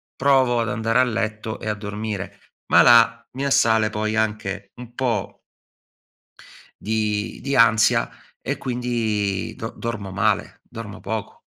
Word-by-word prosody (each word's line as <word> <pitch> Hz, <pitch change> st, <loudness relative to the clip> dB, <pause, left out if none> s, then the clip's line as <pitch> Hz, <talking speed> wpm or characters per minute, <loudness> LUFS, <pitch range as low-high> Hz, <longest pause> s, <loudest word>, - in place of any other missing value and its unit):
provo 130 Hz, -3 st, +3 dB
ad 115 Hz, -, -2 dB
andare 115 Hz, +3 st, +1 dB
a -, -, +6 dB
letto 110 Hz, -2 st, -3 dB
e -, -, -7 dB
a 105 Hz, -, -1 dB
dormire. 105 Hz, -1 st, -5 dB, 0.3 s
Ma -, -, +6 dB
là 115 Hz, -1 st, +5 dB
mi 135 Hz, +2 st, -3 dB
assale 110 Hz, -5 st, +3 dB
poi 110 Hz, 0 st, -2 dB
anche 100 Hz, -3 st, -2 dB
un 120 Hz, -1 st, -11 dB
po' 115 Hz, -7 st, -2 dB, 1.4 s
di 105 Hz, -1 st, -2 dB
di 140 Hz, 0 st, -2 dB
ansia 115 Hz, 0 st, +4 dB, 0.3 s
e -, -, -3 dB
quindi 115 Hz, -6 st, -2 dB
do -, -, -6 dB
dormo 110 Hz, -4 st, -5 dB
male, 95 Hz, -, 0 dB
dormo 115 Hz, -3 st, -8 dB
poco. 110 Hz, -2 st, -5 dB
110 Hz, 135 wpm, -22 LUFS, 105-120 Hz, 1.4 s, a